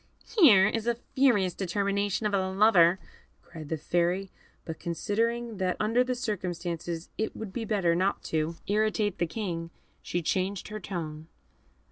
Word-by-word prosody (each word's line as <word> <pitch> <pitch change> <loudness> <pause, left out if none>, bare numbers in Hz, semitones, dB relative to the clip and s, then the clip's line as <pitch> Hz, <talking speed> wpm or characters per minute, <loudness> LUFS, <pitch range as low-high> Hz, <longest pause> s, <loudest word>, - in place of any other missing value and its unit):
"Here 220 - +7
is 225 +1 -2
a 235 - +2 0.2
furious 210 -10 +3
determination 200 +2 -1
of 210 - 0
a 190 -1 +1
lover!" 190 -3 +5 0.5
cried 155 -3 -10
the 160 - -1
Fairy; 175 +4 0 0.3
but 160 - -6
considering 230 +6 -1
that 185 -1 -1
under 225 +4 +3
the 255 0 -2
circumstances 175 -7 -4
it 220 - -2
would 210 -4 -7
be 230 - -3
better 195 -6 +2
not 185 +3 0
to 160 +1 -1
irritate 210 -2 0
the 170 - +1
King, 165 -3 -4 0.3
she 175 -1 -3
changed 190 +4 -1
her 215 0 -5
tone. 160 -5 -6
195 Hz, 150 wpm, -28 LUFS, 170-215 Hz, 0.5 s, Here